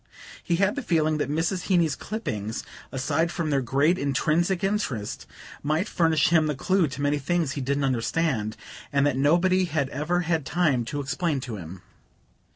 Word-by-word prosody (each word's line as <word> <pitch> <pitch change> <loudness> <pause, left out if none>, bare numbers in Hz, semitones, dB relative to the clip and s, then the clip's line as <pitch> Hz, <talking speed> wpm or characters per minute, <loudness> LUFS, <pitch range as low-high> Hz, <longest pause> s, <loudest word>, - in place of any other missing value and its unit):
He 170 - +1
had 195 +5 +2
the 285 - -2
feeling 155 - +1
that 145 - -1
Mrs. 165 +5 -1
Heeny's 170 -7 +3
clippings, 110 - -4 0.3
aside 145 +5 0
from 165 -4 -2
their 140 -1 +2
great 140 +8 +2
intrinsic 160 +7 +1
interest, 195 - -2 0.3
might 155 +7 0
furnish 160 -5 +2
him 160 -2 +4
the 150 - -1
clue 185 +4 +2
to 135 +1 -5
many 145 +1 +1
things 165 +1 0
he 140 - -4
didn't 140 +2 0
understand, 125 -3 0 0.3
and 140 0 +2
that 145 -3 +2
nobody 175 +7 +3
had 145 -5 -1
ever 160 +6 -1
had 165 -3 0
time 140 -6 +1
to 145 +4 -3
explain 140 +2 -1
to 120 -4 -5
him. 90 +1 -9
150 Hz, 170 wpm, -26 LUFS, 135-175 Hz, 0.3 s, him